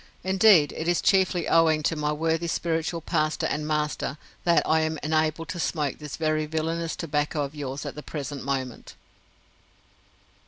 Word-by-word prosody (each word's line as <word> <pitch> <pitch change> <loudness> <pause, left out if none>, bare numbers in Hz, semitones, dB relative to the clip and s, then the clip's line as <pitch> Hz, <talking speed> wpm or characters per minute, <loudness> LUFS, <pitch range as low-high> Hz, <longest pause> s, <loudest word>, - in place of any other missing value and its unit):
Indeed, 190 -5 +5
it 160 - -4
is 175 -1 +2
chiefly 185 -3 +2
owing 160 -2 +4
to 165 - +1
my 150 -1 -1
worthy 165 +2 0
spiritual 165 0 -1
pastor 155 0 0
and 150 0 -2
master 150 -2 -1 0.3
that 170 -1 +3
I 160 - +4
am 160 0 -1
enabled 155 +1 0
to 175 +1 -4
smoke 150 -5 -1
this 150 -2 -6
very 155 -1 0
villainous 165 +1 -2
tobacco 150 -1 -1
of 140 +1 -5
yours 140 -2 -5
at - - -4
the 150 - -8
present 145 -2 -6
moment!" 130 -2 -4
155 Hz, 160 wpm, -26 LUFS, 150-165 Hz, 0.3 s, Indeed